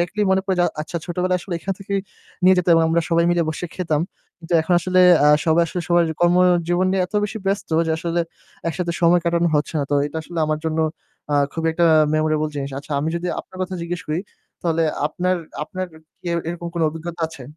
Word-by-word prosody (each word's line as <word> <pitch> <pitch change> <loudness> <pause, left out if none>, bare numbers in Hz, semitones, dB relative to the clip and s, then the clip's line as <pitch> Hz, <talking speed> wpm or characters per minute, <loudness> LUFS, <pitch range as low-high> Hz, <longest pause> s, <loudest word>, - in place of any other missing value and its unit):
দেখলেই 200 +5 0
মনে 190 0 +3
পড়ে 190 -1 0
যে - - +4
আ - - +1
আচ্ছা 160 +3 -5
ছোটবেলায় 180 +1 0
আসলে 180 0 -5
এখান 195 - -2
থেকেই 195 0 -2 0.4
নিয়ে 185 +1 +7
যেত 180 - 0
এবং 165 - +4
আমরা 165 +1 +2
সবাই 170 0 +3
মিলে 175 -1 +2
বসে 155 +3 -3
খেতাম। 160 -4 0 0.4
কিন্তু 170 +1 -8
এখন 160 +3 -1
আসলে, 185 +1 +2 0.2
আ - - +6 0.2
সবাই 160 +1 +4
আসলে 180 - -4
সবার 175 0 +4 0.2
কর্মজীবন 175 0 +3
নিয়ে 190 -1 +2
এত 180 - -22
বেশি 220 +2 -4
ব্যস্ত 195 +1 -1 0.2
যে, - - 0
আসলে 170 0 -1 0.5
একসাথে 170 +1 -2
সময় 175 +1 +5
কাটানো 170 0 +2
হচ্ছে 150 +2 -2
না। - - +1
তো - - +2
এটা 150 +2 -7
আসলে 170 +2 -7
আমার 155 0 0
জন্য, 160 0 -1 0.5
আ - - +3 0.2
খুবই 165 0 -1
একটা 170 +1 +2 0.3
memorable 155 0 +1
জিনিস। 140 -1 -3
আচ্ছা 145 +2 -8
আমি 155 - -1
যদি 175 - -4
আপনার - - -16
কথা 185 0 -4
জিজ্ঞেস 175 +1 -4
করি 155 +2 -1 0.4
তাহলে 165 -1 +1 0.2
আপনার 180 +4 0 0.3
আপনার 185 +4 -4 0.4
কি - - -13 0.2
এরকম 170 0 -5
কোন 170 - -2
অভিজ্ঞতা 165 +2 -7
আছে? 160 -4 -11
170 Hz, 210 wpm, -21 LUFS, 160-180 Hz, 0.5 s, নিয়ে